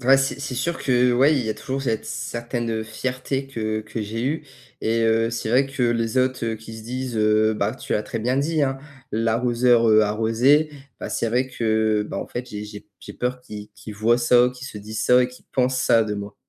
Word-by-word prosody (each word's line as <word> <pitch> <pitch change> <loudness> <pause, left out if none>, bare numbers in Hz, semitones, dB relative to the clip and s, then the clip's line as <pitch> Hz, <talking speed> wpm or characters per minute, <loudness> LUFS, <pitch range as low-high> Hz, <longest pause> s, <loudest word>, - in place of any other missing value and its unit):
ouais, 135 +1 +7
c'est 135 +1 -1
c'est 140 -3 -4
sûr 165 +7 -2
que, 125 -1 +3
ouais, 140 +5 +4
il 125 - 0
y 110 - -3
a - - -2
toujours 135 +1 -4
cette 115 -5 -1
certaine, 120 +1 -4
heu, 110 -1 -1
fierté, 130 +4 -3
que 110 -5 -3
que 110 +1 -6
j'ai 110 +2 -4
eue 155 +4 -1 0.4
et 115 +1 +1
heu, 115 +1 +2
c'est 115 -1 -3
vrai 130 +3 +4
que, 135 -1 -4
les 120 +1 +1
autres, 130 -1 +1
heu, 115 -1 -1
qui 110 +1 -10
se 110 - -9
disent, 125 +1 -4
heu, 110 0 +3
bah - - -1
tu - - -6
l'as 105 - +1
très 115 - -5
bien 125 +4 0
dit, 155 +2 +1
hein, 135 -1 0 0.3
l'arroseur, 115 +1 +3
heu, 110 0 +6
arrosé. 115 +8 +3 0.3
Bah - - -5
c'est 115 - -1
vrai 125 +3 +1
que, 110 -3 +1
bah, - - -4
en - - -4
fait, 125 +1 -6
j'ai 105 0 -6
j'ai 105 0 -9
p - - -30
j'ai - - -10
peur 125 +1 -3
qu'ils 105 -3 -9
qu'ils 105 +2 -10
voient 115 +4 +2
ça, 120 +1 +5
qu'ils 125 +2 -9
se 105 - -8
disent 105 +2 -6
ça 125 0 +6
et 125 - 0
qu'ils 125 - -16
pensent 130 0 +1
ça 115 -2 +4
de 105 -1 -3
moi. 100 0 -6
115 Hz, 240 wpm, -23 LUFS, 110-130 Hz, 0.4 s, ouais